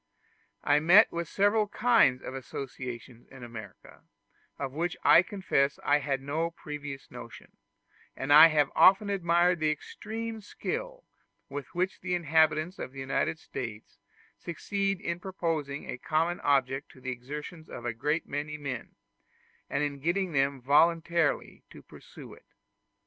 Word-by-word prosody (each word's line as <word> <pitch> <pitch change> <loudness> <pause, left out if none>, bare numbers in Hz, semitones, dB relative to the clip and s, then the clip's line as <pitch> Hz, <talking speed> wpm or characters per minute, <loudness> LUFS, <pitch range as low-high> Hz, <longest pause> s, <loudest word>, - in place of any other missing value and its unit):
I 145 +1 +4
met 180 +8 +6
with 170 0 -3
several 205 +3 +2
kinds 205 - +3
of - - -6
associations 125 -2 -7
in 135 -2 -13
America, 110 -5 -11 0.6
of 130 - -4
which 165 +5 -2
I - - +8
confess 185 -8 0
I 145 +1 +3
had 140 -2 -2
no 160 +4 -1
previous 150 -4 -8
notion; - - -11 0.7
and 135 +2 +1
I 155 +2 +11
have 150 -3 +2
often 200 +2 +6
admired 175 -2 +2
the 155 -1 +2
extreme 220 +8 -5
skill - - -5 0.5
with 140 +3 -7
which 185 +2 -1
the 180 -1 -1
inhabitants 160 +1 +2
of 130 - -6
the 135 - -9
United 135 +4 -1
States 115 -8 -8 0.4
succeed 195 +3 -2
in 170 0 -3
proposing 165 -7 -3
a 125 - -6
common 165 +4 0
object 135 -1 +1
to - - -16
the 130 0 -4
exertions 150 +6 -8
of 120 - -8
a 120 - -1
great 150 +8 -1
many 150 +2 -4
men, 140 -5 -6 0.7
and 150 - 0
in 145 -1 -3
getting 175 +5 0
them 135 -1 +1
voluntarily 165 +4 +2
to - - -14
pursue - - -13
it. - - -18
155 Hz, 145 wpm, -29 LUFS, 135-175 Hz, 0.7 s, I